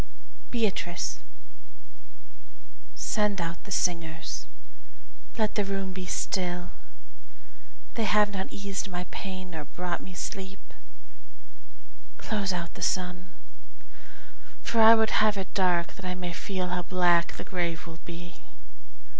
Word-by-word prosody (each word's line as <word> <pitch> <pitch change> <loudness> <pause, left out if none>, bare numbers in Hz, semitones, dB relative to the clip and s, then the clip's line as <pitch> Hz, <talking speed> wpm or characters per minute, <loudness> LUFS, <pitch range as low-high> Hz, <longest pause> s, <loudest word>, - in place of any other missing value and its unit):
Beatrice 205 -7 0 1.8
Send 210 -3 +1
out 170 0 -3
the 200 - -9
singers 165 -3 0 0.9
let 215 -2 +2
the 210 - +2
room 195 -1 -2
be 185 -1 -5
still; 180 -1 -1 1.2
They 225 - +1
have 210 0 +5
not 190 -1 -2
eased 200 0 -3
my 180 -1 -2
pain 185 -2 -5
nor 155 -3 -5
brought 180 +1 -3
me 185 - -9
sleep. 190 +1 -5 1.4
Close 205 -3 0
out 170 -2 -3
the - - -10
sun, 180 -1 0 1.3
for 230 -1 +3
I 225 +1 +11
would 220 -1 +3
have 215 -1 +4
it 190 -1 -4
dark 180 -3 +3
That 195 - -9
I 180 0 -1
may 180 -1 -3
feel 185 0 -2
how 180 0 0
black 175 -1 +3
the - - -6
grave 175 -2 -1
will 165 -1 -9
be. 175 +1 -8
185 Hz, 125 wpm, -29 LUFS, 175-200 Hz, 1.8 s, I